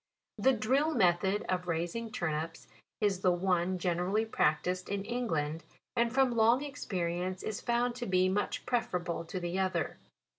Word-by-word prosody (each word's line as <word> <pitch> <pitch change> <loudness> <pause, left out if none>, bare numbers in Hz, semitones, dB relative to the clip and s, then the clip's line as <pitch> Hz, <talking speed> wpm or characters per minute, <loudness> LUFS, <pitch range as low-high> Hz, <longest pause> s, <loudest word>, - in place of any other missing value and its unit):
The 265 - +5
drill 265 +8 +1
method 190 +1 +2
of 180 -1 -1
raising 175 +7 -2
turnips 160 -2 -3 0.3
is 200 -3 +2
the 185 - +3
one 180 0 +1
generally 180 +4 0
practised 180 -2 0
in 200 0 -2
England, 165 -10 -2 0.3
and 235 0 +2
from 255 -1 +3
long 230 +4 +4
experience 185 -9 -3
is 215 0 -3
found 240 0 +1
to 245 - -4
be 185 -1 +3
much 195 +2 -1
prefer 240 -7 0
able 175 -1 -3
to 185 - -4
the 175 +1 -2
other. 190 -1 -1
190 Hz, 155 wpm, -32 LUFS, 175-230 Hz, 0.3 s, The